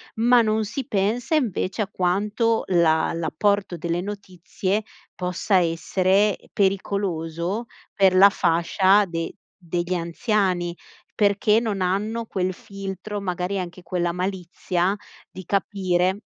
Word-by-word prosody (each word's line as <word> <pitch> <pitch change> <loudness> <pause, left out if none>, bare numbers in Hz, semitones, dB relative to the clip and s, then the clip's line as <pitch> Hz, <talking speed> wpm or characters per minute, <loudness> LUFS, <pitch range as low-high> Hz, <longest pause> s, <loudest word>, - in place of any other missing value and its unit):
ma 240 +2 +5
non 220 0 +1
si 260 +5 -5
pensa 220 +9 0
invece 215 - 0
a - - -6
quanto 210 +5 0
la 165 -3 +3
l'apporto 175 +4 0
delle 170 +1 -2
notizie, 195 0 -3 0.3
possa 180 +2 0
essere 185 +4 +2
pericoloso 190 0 -1 0.3
per 190 -2 +4
la 195 +2 +8
fascia 190 +5 +3
de 165 -2 -4 0.4
degli 175 +2 -1
anziani, 175 0 0 0.4
perché 210 +1 +3
non 210 -5 -2
hanno 210 +5 -1
quel 185 -2 -1
filtro, 195 +2 -6
magari 180 0 -2
anche 180 0 -5
quella 175 -2 -1
malizia 180 0 -1 0.4
di 185 - -9
capire 190 0 0
190 Hz, 115 wpm, -23 LUFS, 175-205 Hz, 0.4 s, la